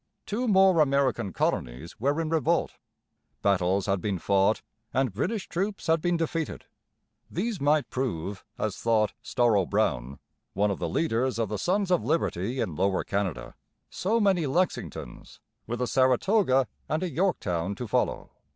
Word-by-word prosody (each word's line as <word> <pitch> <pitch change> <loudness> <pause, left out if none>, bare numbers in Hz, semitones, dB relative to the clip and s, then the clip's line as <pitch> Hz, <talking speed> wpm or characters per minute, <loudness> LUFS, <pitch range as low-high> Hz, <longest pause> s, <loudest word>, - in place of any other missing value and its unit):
Two 240 +5 -2
more 190 -4 +5
American 135 -8 +2
colonies 65 +1 -2
were 140 +6 +1
in 160 -1 -1
revolt. 160 -6 +1 0.7
Battles 95 -1 +2
had 95 -2 0
been 100 -3 -1
fought 100 +4 +2 0.3
and 130 -5 +1
British 185 - -2
troops 195 +4 -3
had 160 -1 +2
been 175 0 +1
defeated. 165 -1 -3 0.6
These 205 +1 -2
might 145 -1 +3
prove, 100 -7 -3
as 105 -3 -2
thought 110 -3 +1
Storrow 110 -6 +2
Brown, 60 +3 0 0.4
one 100 +1 +1
of 100 - -3
the 85 - -2
leaders 125 - 0
of 115 -3 -1
the 105 - -3
'Sons 190 - 0
of 180 - +3
Liberty' 120 - -1
in 110 -9 -1
Lower 95 +2 +1
Canada, 85 -12 -3 0.4
so 220 +5 0
many 190 -7 +2
Lexingtons, 150 - -3 0.3
with 120 +1 -3
a 125 - +1
Saratoga 130 - +3 0.2
and 155 +3 0
a 180 - -2
Yorktown 100 - 0
to 120 +3 -5
follow. - - -1
125 Hz, 150 wpm, -27 LUFS, 100-165 Hz, 0.7 s, more